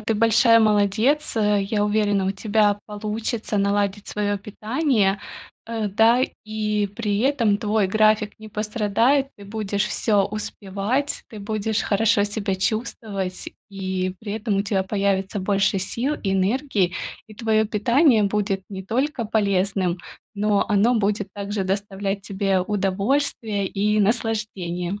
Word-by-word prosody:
Ты 220 +1 -1
большая 230 +1 +5
молодец, 215 +7 +2
э. 210 -2 +2
Я 205 +1 0
уверена, 205 -2 +1
у 190 - +1
тебя 205 0 +1
получится 215 +1 -3
наладить 200 0 0
своё 205 -1 -1
питание. 215 0 0 0.5
Э, 225 -2 -2
да, 225 +5 +4 0.2
и 210 -1 -1
при 210 -3 -1
этом 235 -6 +2
твой 210 -2 +1
график 215 0 +2
не 215 0 -10
пострадает, 220 +6 +1
ты 205 - -12
будешь 205 0 -2
всё 205 -3 +2
успевать, 210 +6 -3
ты 220 - -10
будешь 215 +1 -1
хорошо 215 +1 +2
себя 205 -1 -2
чувствовать, 200 -2 -3 0.2
и 190 -1 -3
при 210 -2 -5
этом 215 -1 -1
у 200 - +2
тя 200 -2 0
появится 195 0 -1
больше 195 +1 +1
сил, 245 +10 -2
энергий, 195 0 +1 0.3
и 215 - -13
твоё 220 -1 +1
питание 235 +4 +3
будет 200 -1 -1
не 190 -2 -6
только 255 +4 -1
полезным, 195 -4 0 0.4
но 205 0 +2
оно 210 +4 +3
будет 205 0 0
также 200 0 -3
доставлять 195 0 -2
тебе 195 -1 0
удовольствие 205 +2 0
и 210 +2 0
наслаждение. 205 -4 -1
210 Hz, 130 wpm, -23 LUFS, 195-220 Hz, 0.5 s, большая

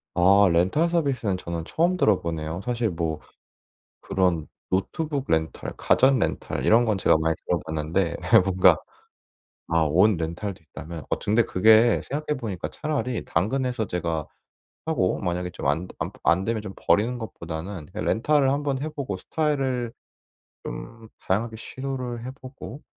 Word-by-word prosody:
아 95 +2 +6
렌탈 95 - +2
서비스는 135 - 0
저는 85 -2 -5
처음 175 - +1
들어 105 - +3
보네요. 80 +1 -4
사실 120 -2 0
뭐 80 -3 -2 0.8
그런 90 -5 0 0.2
노트북 140 +9 -1
렌탈, 80 0 -1
가전 130 -1 +4
렌탈 - - -2
이런 120 +2 +5
건 110 -3 +1
제가 85 - +4
많이 80 0 +1
들어 85 - +1
봤는데 80 +3 -1 0.2
예 - - +10
뭔가 95 0 +4 0.9
아 85 0 +2
옷 90 +8 +4
렌탈도 85 +3 -4
있다면 80 0 -9
어쩌 - - -2
근데 115 +2 +5
그게 110 +5 +5
생각해 150 +1 -2
보니까 105 -8 -4
차라리 145 -6 -3
당근에서 125 +5 0
제가 85 -4 -2 0.6
사고 155 - +1
만약에 90 -1 -2
좀 - - -8
안 80 +6 0
되 - - -14
안 - - -2
부 - - -19
안 85 +6 +3
되면 115 0 -1
좀 95 -2 -7
버리는 115 +4 +2
것보다는 85 -5 -6
예 - - -3
렌탈을 140 +4 +2
한번 140 -1 -1
해 155 - -2
보고 140 -10 -4
스타일을 130 - -1 0.7
좀 110 - -8
다양하게 110 +4 -1
시도를 125 -1 -5
해 - - -4
보고 135 +2 -10
105 Hz, 310 characters per minute, -25 LUFS, 85-130 Hz, 0.9 s, 예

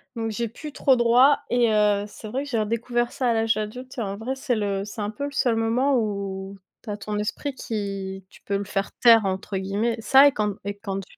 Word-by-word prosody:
Donc 225 -1 -2
j'ai 235 +1 -2
plus 295 +6 -9
trop 265 -2 +3
droit 245 +4 +5
et 240 -2 +3
heu, 210 -1 +3
c'est 210 +1 -10
vrai 260 +6 -3
que 290 - -8
j'ai 230 - 0
redécouvert 235 +2 -1
ça 255 -2 0
à - - +3
l'âge 225 0 +2
adulte 250 +5 -6
et - - -1
en 200 -2 -3
vrai 245 +5 -3
c'est 260 -2 -1
le 200 -2 -1
c'est 205 +2 -9
un 205 0 -2
peu 220 +6 -6
le 285 - -3
seul 250 -4 +1
moment 240 +5 +2
où 200 -3 -3 0.3
tu 230 - -9
as 205 - -3
ton 210 0 -4
esprit 240 +7 -3
qui 195 -5 -5
tu - - -19
peux 200 - -1
le 200 - -4
faire 195 0 -2
«taire» 230 -3 +7
entre 190 +1 -3
guillemets, 205 +5 -1
ça 270 +5 +7
et 285 - +2
quand 210 -3 -1
et 200 0 -3
quand 195 -2 -4
j - - -20
220 Hz, 245 wpm, -24 LUFS, 200-245 Hz, 0.3 s, taire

